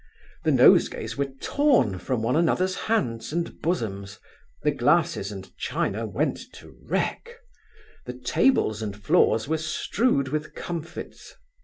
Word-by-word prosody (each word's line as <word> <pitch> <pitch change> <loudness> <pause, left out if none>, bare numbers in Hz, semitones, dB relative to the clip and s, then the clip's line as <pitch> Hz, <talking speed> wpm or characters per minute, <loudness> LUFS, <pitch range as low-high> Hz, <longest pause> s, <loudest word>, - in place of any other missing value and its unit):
The - - +4
nosegays - - +4
were 140 0 -1
torn 245 - +2
from 120 +1 -2
one 115 - +1
another's 180 +3 +2
hands 120 - -1
and 170 +2 -3
bosoms; 105 - -3 0.5
the - - +3
glasses 100 +1 +1
and 95 -2 -10
china 110 +3 -2
went 135 +8 -1
to - - -14
wreck; 470 0 -2 0.7
the 125 - -4
tables 125 - +1
and 105 -2 -4
floors 105 +3 +2
were 160 +1 0
strewed 155 - 0
with 150 +2 -4
comfits. 170 -2 -7
140 Hz, 130 wpm, -25 LUFS, 110-170 Hz, 0.7 s, The